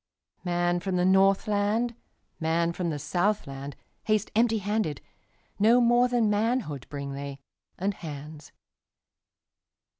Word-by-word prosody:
Man 175 -1 +1
from 185 +1 -2
the 180 0 +2
Northland, 205 +4 +3 0.5
Man 170 +1 +1
from 175 -1 -2
the 150 - -2
Southland, 145 -3 -2 0.3
Haste 215 -1 +1
empty 225 0 +3
handed; 205 -7 -1 0.6
No 225 +4 +6
more 240 +1 +4
than 240 -3 +2
manhoodBring 155 - -1
they, 140 0 -6 0.4
and 200 +3 -1
hands. 150 -2 -9
190 Hz, 110 wpm, -27 LUFS, 155-215 Hz, 0.6 s, No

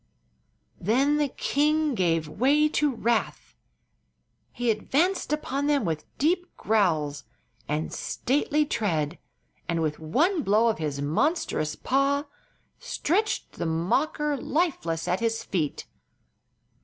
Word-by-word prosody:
Then 270 - +2
the 295 -1 +2
king 300 +2 +1
gave 165 -7 +1
way 275 - +3
to 295 -1 +1
wrath. 235 -1 -1 1.0
He 245 -1 0
advanced 300 - 0
upon 285 -2 -1
them 285 -6 +2
with 160 -3 -2
deep 355 +5 +1
growls 155 -9 +1 0.4
and 150 +2 -2
stately 295 +3 0
tread 165 - -1 0.5
and 170 -1 0
with 155 -2 -1
one 305 - +1
blow 220 +1 +3
of 220 - -1
his 145 -3 -2
monstrous 155 - 0
paw 275 +2 +1 0.5
stretched 415 +8 -1
the 170 - -1
mocker 290 - 0
lifeless 255 - -1
at 180 +1 +1
his 225 -1 -1
feet. 160 -7 -2
235 Hz, 115 wpm, -26 LUFS, -, 1.0 s, way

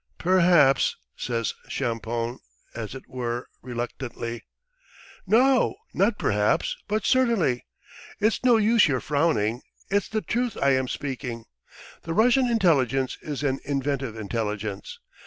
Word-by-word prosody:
"Perhaps," 170 -6 +4 0.2
says 115 -2 -2 0.2
Champoun, 115 -1 -2 0.3
as 115 +1 -6
it 135 - -10
were 120 -1 -4
reluctantly. 120 -1 -5 0.9
"No, 250 +5 +4 0.2
not 205 +3 +2
perhaps, 105 0 +1
but 210 -1 -1
certainly! 230 - +2 0.5
It's 215 +3 +1
no 245 -2 +5
use 220 -1 +4
your 130 -4 +1
frowning, 130 -7 0 0.3
it's 200 0 +1
the 215 0 -1
truth 240 -1 -1
I 140 - +3
am 130 -1 +1
speaking. 125 -4 -5 0.6
The 165 0 -4
Russian 250 +4 +4
intelligence 135 - +2
is 150 -1 -5
an 135 -1 0
inventive 140 -3 -2
intelligence. 105 -2 -4
135 Hz, 120 wpm, -25 LUFS, -, 0.9 s, no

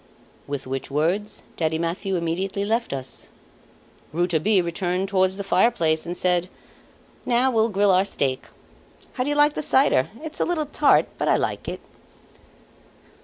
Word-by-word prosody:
With 140 -1 -4
which 135 0 -4
words 170 +9 -1
Daddy 160 -1 0
Mathieu 175 +4 -2
immediately 185 +4 -2
left 230 +3 -1
us. 135 -1 -5 0.8
Rouletabille 175 +4 +2
returned 180 +2 -1
towards 190 -1 +1
the 200 - -4
fireplace 180 -6 +2
and 175 +1 -4
said: 180 0 +1 0.7
"Now 250 +2 +2
we'll 225 -1 +2
grill 200 -1 +3
our 185 +1 +4
steak. 135 -9 -2 0.7
How 255 - -1
do 275 - -1
you 290 - 0
like 295 0 +4
the - - -3
cider? 265 - +3
It's 315 -1 -6
a - - +3
little 335 -3 -1
tart, 295 +1 +3
but - - -1
I - - +4
like - - -2
it." - - -6
190 Hz, 155 wpm, -23 LUFS, 165-225 Hz, 0.8 s, our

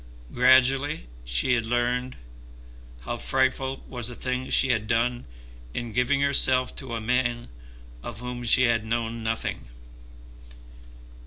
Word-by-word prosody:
Gradually 130 - +3 0.2
she - - +2
had 120 -2 +1
learned 120 +2 -1 0.8
how - - -4
frightful 130 - 0
was 120 -3 -4
the 125 - -6
thing 130 +1 -3
she 135 - +3
had 110 -4 0
done 120 - 0 0.5
in 120 -2 -4
giving 125 +4 +1
herself 130 -2 +2
to 130 -4 -5
a - - -3
man 120 - -1 0.5
of 115 - -7
whom 125 +1 -6
she 120 +3 +6
had 115 -3 +2
known 115 0 -3
nothing. 110 - -3
120 Hz, 130 wpm, -25 LUFS, 115-130 Hz, 0.8 s, she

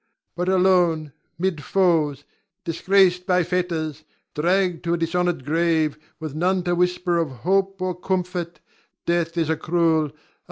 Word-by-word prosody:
But 180 +1 -1
alone, 180 -5 +3 0.3
'mid 170 -4 -1
foes, 155 -6 +1 0.4
disgraced 180 +2 +2
by 180 -1 +3
fetters, 160 -4 -2 0.3
dragged 180 +2 +1
to 170 0 +1
a - - -3
dishonored 170 -3 -1
grave, 160 -1 +1 0.2
with 155 -3 -6
none 180 +4 +1
to 175 -1 0
whisper 180 0 +1
of 165 -3 0 0.2
hope 195 +1 +1
or 185 0 -1
comfort, 180 -1 -3 0.4
death 170 0 0
is 165 -2 +1
a - - +2
cruel, 165 0 +2
a - - +2
most 145 - -8
bitter - - -31
foe. - - -32
175 Hz, 160 wpm, -23 LUFS, 160-180 Hz, 0.4 s, alone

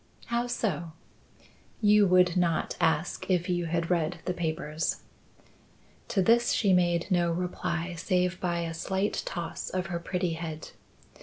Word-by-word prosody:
"How 240 +1 +1
so?" 175 -9 -2 0.9
"You 210 -1 +5
would 180 -1 +4
not 170 -3 +1
ask 160 +3 0
if 180 -1 +2
you 175 -1 0
had 170 +1 -1
read 170 0 +1
the 180 - 0
papers." 160 -2 -2 1.0
To 195 -4 +1
this 235 +5 +4
she 200 -4 +3
made 175 0 +2
no 175 -2 +3
reply 175 0 -2
save 180 +1 0
by 175 -2 -1
a 165 -1 -3
slight 190 +5 -1
toss 170 -2 -4
of 185 -1 -2
her 170 - -1
pretty 180 0 -2
head. 160 -1 -6
175 Hz, 145 wpm, -28 LUFS, 165-185 Hz, 1.0 s, You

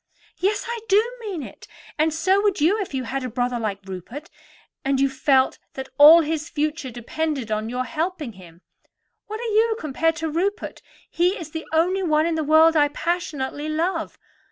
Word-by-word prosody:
"Yes, 400 +3 0
I 470 0 -3
do 400 +1 +6 0.2
mean 395 -9 -5
it; - - -12 0.3
and 315 +1 +3
so 370 +6 +2
would 405 -3 +1
you 375 +9 +3
if 390 - -5
you 265 -2 -2
had 265 +3 -3
a 255 - -3
brother 245 +1 -1
like 200 -3 -4
Rupert, 210 - -8 0.5
and 270 -1 +1
you 275 - +4
felt 265 0 +2 0.2
that 265 0 -6
all 315 +3 +10
his 315 0 -3
future 300 -2 -2
depended 250 +1 -3
on 215 +1 -1
your 250 +1 -2
helping 320 -3 -3
him. 175 -3 -15 0.7
What 430 +1 -5
are 460 -2 -3
you 445 +1 +3
compared 320 +2 0
to 320 0 -3
Rupert? 380 +6 -2 0.3
He 355 +3 +1
is 320 -3 -8
the 320 0 -6
only 355 +4 +2
one 310 -3 +2
in 335 - 0
the 320 -1 -1
world 315 +2 +5
I 295 -1 +5
passionately 295 -2 -3
love. 330 +2 -2
310 Hz, 185 wpm, -23 LUFS, 265-345 Hz, 0.7 s, all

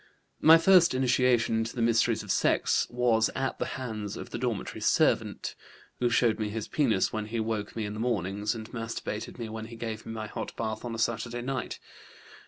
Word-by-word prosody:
"My 160 +1 +8
first 175 -3 +5
initiation 125 -3 +3
into 110 +1 -2
the 120 - -2
mysteries 115 -1 +2
of - - -3
sex - - +2
was 120 -2 +2
at 135 0 -2
the - - -1
hands 110 -5 -5
of - - -8
the - - -4
dormitory 120 -5 -3
servant, - - +1 0.5
who 120 - +2
showed 115 -2 +2
me 105 -1 -1
his 110 0 -4
penis 115 -10 +1
when 110 -1 -3
he 115 +1 -3
woke 110 -2 -3
me 110 -2 -2
in 105 - -4
the 105 - -6
mornings, 105 -2 -1
and 110 -1 -7
masturbated 115 -2 -5
me 115 -2 -4
when 110 0 -6
he 115 +1 -10
gave 110 -1 -5
me - - -5
my 110 -1 -4
hot - - -6
bath 110 -1 -3
on 120 -2 -4
a - - -5
Saturday 115 +1 -1
night. 130 -2 -3
115 Hz, 200 wpm, -28 LUFS, 110-120 Hz, 0.5 s, My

